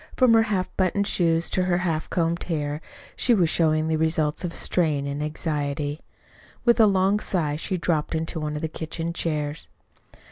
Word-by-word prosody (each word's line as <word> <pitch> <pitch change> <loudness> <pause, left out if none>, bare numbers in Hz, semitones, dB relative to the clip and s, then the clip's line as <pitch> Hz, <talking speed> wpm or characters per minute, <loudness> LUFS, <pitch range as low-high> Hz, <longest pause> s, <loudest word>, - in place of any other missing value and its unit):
From 255 -3 +5
her 225 - +6
half 200 -5 0
buttoned 195 +2 +1
shoes 165 -3 +2
to 185 - +1
her 175 -1 +2
half 165 -3 -2
combed 170 0 -1
hair 150 -2 -2 0.3
she 240 - +3
was 175 -5 +2
showing 155 -1 +2
the 160 0 +1
results 160 0 0
of 175 - -2
strain 155 -5 0
and 140 +1 -3
anxiety. 150 -1 -2 0.7
With 235 -1 +4
a 220 - +7
long 195 +1 +2
sigh 160 -8 -1
she 185 +5 -2
dropped 165 -2 -1
into 160 +1 -2
one 150 -1 -3
of 150 - -5
the - - +1
kitchen 165 +1 -4
chairs. 150 -2 -2
165 Hz, 180 wpm, -24 LUFS, 150-185 Hz, 0.7 s, a